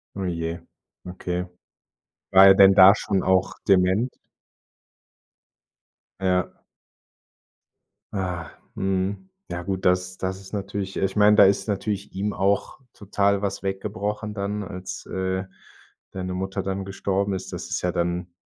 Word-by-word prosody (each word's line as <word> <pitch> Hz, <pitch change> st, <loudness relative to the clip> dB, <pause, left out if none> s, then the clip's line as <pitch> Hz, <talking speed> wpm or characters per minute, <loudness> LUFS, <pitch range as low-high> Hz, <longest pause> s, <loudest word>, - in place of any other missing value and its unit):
Oh 100 Hz, -1 st, -3 dB
je. 85 Hz, 0 st, -3 dB, 0.5 s
Okay. 90 Hz, 0 st, -4 dB, 0.8 s
War 95 Hz, +1 st, +8 dB
er 95 Hz, -, +8 dB
denn 95 Hz, 0 st, +8 dB
da 95 Hz, +1 st, +9 dB
schon 100 Hz, -3 st, -1 dB
auch 95 Hz, +1 st, +2 dB
dement? 95 Hz, +6 st, +3 dB, 2.1 s
Ja. 90 Hz, -2 st, +1 dB, 1.6 s
Ah, 90 Hz, -5 st, -3 dB, 0.2 s
mhm. 95 Hz, -, -2 dB, 0.2 s
Ja 85 Hz, -, -3 dB
gut, 95 Hz, 0 st, -4 dB
das 90 Hz, 0 st, +1 dB
das 95 Hz, 0 st, -3 dB
ist 95 Hz, -, -13 dB
natürlich 100 Hz, -1 st, -4 dB
ich 95 Hz, 0 st, -1 dB
meine, 105 Hz, 0 st, +6 dB
da -, -, +8 dB
ist 100 Hz, +3 st, +2 dB
natürlich 100 Hz, 0 st, -3 dB
ihm 100 Hz, +2 st, -2 dB
auch 100 Hz, +5 st, 0 dB
total 100 Hz, -1 st, 0 dB
was 100 Hz, -1 st, -2 dB
weggebrochen 105 Hz, +2 st, -3 dB
dann, 105 Hz, 0 st, -3 dB
als, 90 Hz, -1 st, -7 dB
äh, 95 Hz, 0 st, -2 dB, 0.7 s
deine 95 Hz, -1 st, -4 dB
Mutter 95 Hz, +1 st, -3 dB
dann 95 Hz, 0 st, -3 dB
gestorben 100 Hz, 0 st, -1 dB
ist, 95 Hz, 0 st, -6 dB
das -, -, -6 dB
ist -, -, -2 dB
ja 90 Hz, -, +1 dB
dann 85 Hz, 0 st, -2 dB
95 Hz, 135 wpm, -24 LUFS, 95-100 Hz, 2.1 s, da